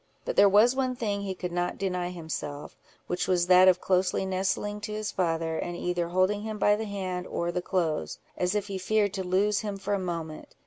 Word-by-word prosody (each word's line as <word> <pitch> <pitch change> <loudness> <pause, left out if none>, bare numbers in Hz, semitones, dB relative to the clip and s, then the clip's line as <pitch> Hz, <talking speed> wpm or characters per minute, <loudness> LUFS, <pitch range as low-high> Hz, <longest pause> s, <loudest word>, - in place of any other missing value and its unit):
But - - -2
there 200 - +7
was 220 +6 +5
one 260 -1 0
thing 205 -4 -2
he 195 -1 -4
could 180 -1 -5
not 175 0 -1
deny 180 -2 -2
himself, 160 -4 -6 0.3
which 180 - -2
was 180 -2 +2
that 185 +1 +7
of 185 -1 +5
closely 185 +1 +1
nestling 195 +2 -1
to 210 0 -5
his 215 0 -3
father, 165 -2 -1
and 175 0 -4
either 175 -1 -1
holding 185 +4 +1
him 215 0 -4
by 205 0 +4
the 220 +1 -4
hand 185 -3 -4
or 170 0 -2
the 180 +1 -2
clothes, 170 -4 -1 0.2
as 180 +2 0
if 205 -1 0
he 195 -2 -5
feared 205 +1 +1
to 190 - -3
lose 195 +3 +2
him 205 -2 -4
for 195 +1 -3
a 200 - +1
moment. 165 -4 -5
185 Hz, 220 wpm, -28 LUFS, 175-205 Hz, 0.3 s, there